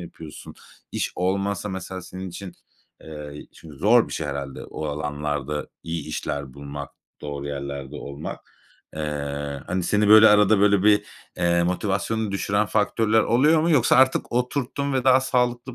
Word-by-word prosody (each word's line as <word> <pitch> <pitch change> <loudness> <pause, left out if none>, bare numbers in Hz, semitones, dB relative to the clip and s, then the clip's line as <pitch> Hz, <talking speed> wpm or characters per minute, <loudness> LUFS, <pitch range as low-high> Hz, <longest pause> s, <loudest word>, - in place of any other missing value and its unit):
yapıyorsun? 80 -3 -10 0.4
İş - - -2
olmasa 100 +2 -1
mesela 95 -1 -6
senin 95 +2 -7
için 90 +1 -8 0.5
eee, 75 -1 -9
çünkü 75 -3 -13
zor 110 - +4
bir - - -8
şey - - -3
herhâlde 70 -1 -5
o 80 - -6
alanlarda 75 -1 -3 0.2
iyi 80 -2 -4
işler 70 -3 -4
bulmak, 70 0 -7 0.3
doğru 70 -1 -5
yerlerde 70 -1 -5
olmak. 70 +1 -7 0.6
Eee, 70 -2 -4
hani, 90 +1 -1
seni, 105 +3 +2
böyle, 110 +1 +9
arada, 105 0 +5
böyle, 100 -1 +4
bir, 105 0 +4 0.3
eee, 85 0 +2
motivasyonunu 100 +4 -1
düşüren 100 +2 0
faktörler 110 +1 +2
oluyor 150 +9 +4
mu? 165 +2 +1
Yoksa 130 -6 +4
artık 130 0 +3
oturttum 135 +3 -1
ve 130 -1 0
daha 130 0 +6
sağlıklı 125 -1 -1
95 Hz, 150 wpm, -24 LUFS, 75-110 Hz, 0.6 s, böyle